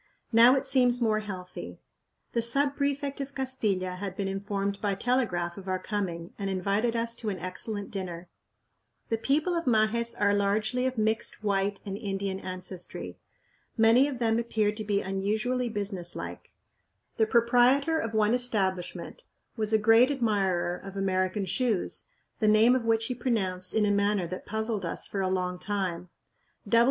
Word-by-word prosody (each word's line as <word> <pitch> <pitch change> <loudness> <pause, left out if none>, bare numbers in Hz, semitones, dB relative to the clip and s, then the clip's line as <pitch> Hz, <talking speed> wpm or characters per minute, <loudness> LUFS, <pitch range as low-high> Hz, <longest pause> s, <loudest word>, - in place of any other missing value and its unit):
Now 235 +3 +8
it 270 - -1
seems 250 -2 +3
more 220 -3 +2
healthy. 190 -4 -7 0.5
The 235 - +1
sub 275 +5 +3
prefect 280 0 -1
of 275 0 -6
Castilla 205 -9 -1
had 195 -1 -5
been 200 - -1
informed 200 0 -3
by 200 -2 0
telegraph 190 -7 0
of 195 - -12
our 185 0 0
coming, 185 -4 -4
and 200 -1 -2
invited 200 +5 0
us 230 0 -1
to 220 - -2
an 195 - -3
excellent 200 +3 -4
dinner. 180 -3 -5 0.8
The 225 - 0
people 300 +9 +1
of 335 -1 -1
Majes 235 0 +2
are 205 0 +3
largely 215 +5 +1
of 260 -1 -3
mixed 220 0 0
white 200 -1 0
and 195 -1 -4
Indian 195 -1 -3
ancestry. 185 -1 -5 0.6
Many 230 +5 +5
of 280 -3 -4
them 230 -1 +1
appeared 215 -3 0
to 215 - -3
be 205 -1 0
unusually 215 +6 -1
businesslike. 195 -5 -3 0.7
The 220 - +3
proprietor 250 +7 +4
of 225 -4 -3
one 215 +1 +3
establishment 205 - -2 0.3
was 215 -2 -2
a 220 - +5
great 225 +4 +5
admirer 195 -9 0
of 195 0 -9
American 190 +1 0
shoes, 200 +2 -1 0.3
the 215 - +2
name 215 +3 +6
of 250 -3 -1
which 225 0 +2
he 250 - -2
pronounced 195 -7 -2
in 215 -1 +3
a 205 - +2
manner 200 -2 +1
that 185 +2 -7
puzzled 220 -1 -2
us 170 - -3
for 195 - -3
a 190 - 0
long 180 -1 -1
time. 180 -4 -3
210 Hz, 165 wpm, -28 LUFS, 190-235 Hz, 0.8 s, Now